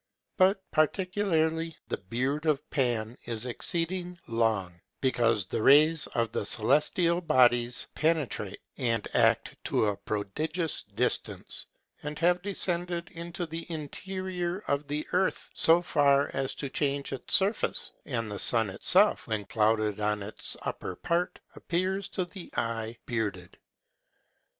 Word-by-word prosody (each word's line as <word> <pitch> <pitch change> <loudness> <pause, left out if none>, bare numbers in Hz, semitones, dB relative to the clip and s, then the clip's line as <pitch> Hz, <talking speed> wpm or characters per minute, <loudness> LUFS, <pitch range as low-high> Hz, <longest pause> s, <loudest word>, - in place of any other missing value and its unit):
But 190 +1 +3
particularly 165 -1 +1
the - - -3
beard 130 - -2
of 150 -1 +1
Pan 120 -4 -1
is 115 0 -3
exceeding 175 - -2
long, 110 -6 0 0.3
because 115 -6 +2
the 110 - -3
rays 150 +5 +5
of 115 -1 +1
the - - -2
celestial 150 +8 +2
bodies 120 -5 +3
penetrate, 150 - -1 0.2
and 115 -4 0
act - - +3
to - - +2
a 105 -1 +1
prodigious 155 - -2
distance, 125 +3 -1 0.3
and 150 +1 -5
have 175 +2 +2
descended 175 -3 -2
into 170 +1 -5
the 165 +2 -7
interior 180 +4 -4
of 140 0 -1
the 150 +1 -2
earth, 190 +1 0
so 170 +2 +5
far 140 -3 +3
as 135 -1 -2
to 140 - -4
change 140 -1 -1
its 130 - -1
surface; 200 +3 +1
and 115 -5 -3
the 100 - -4
sun 115 -3 +4
himself, 95 - +4
when 105 -2 -2
clouded 110 -1 +1
on 105 -1 0
its 105 - -4
upper 95 - -4
part, 170 - -1 0.2
appears 185 +3 -1
to 185 - -2
the 175 0 -10
eye 115 0 -2
bearded. 105 -7 -3
145 Hz, 130 wpm, -29 LUFS, 115-170 Hz, 0.3 s, rays